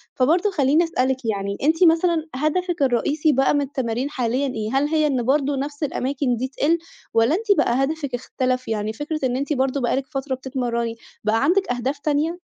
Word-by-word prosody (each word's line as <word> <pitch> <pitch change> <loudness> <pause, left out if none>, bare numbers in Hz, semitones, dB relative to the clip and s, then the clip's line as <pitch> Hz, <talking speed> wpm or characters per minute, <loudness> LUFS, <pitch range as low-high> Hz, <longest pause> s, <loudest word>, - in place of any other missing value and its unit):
فبرضه 330 +10 +2
خلّيني 295 -1 +3
أسألِك، 260 -5 -1
يعني 200 -2 -2
أنتِ 320 +4 +3
مثلًا 330 -1 +3
هدفِك 340 +4 -1
الرئيسي 285 +5 +2
بقى 270 0 +3
من 290 - +2
التمارين 260 -2 -2
حاليًا 255 0 -1
إيه؟ 220 -5 -3
هل 275 +2 +2
هي 310 -1 +2
إن 260 -4 0
برضه 280 +3 +1
نفس 285 +2 -4
الأماكن 270 -2 -1
دي 250 +3 -2
تقِل 290 +5 +1 0.4
والّا 230 +7 +3
أنتِ 425 +2 -1
بقى 250 +3 +2
هدفِك 285 -2 -2
اختلف؟ 255 0 -2
يعني 215 -1 -2
فكرة 300 +5 -4
إن 250 -1 0
أنتِ 285 +3 -1
برضه 265 0 0
بقى 240 - +1
لِك 270 0 -2
فترة 270 -2 -3
بتتمرّني، 245 -3 -3 0.3
بقى 220 +4 +1
عندِك 365 +1 +2
أهداف 255 +4 -2
تانية؟ 305 +4 0
270 Hz, 185 wpm, -22 LUFS, 250-305 Hz, 0.4 s, خلّيني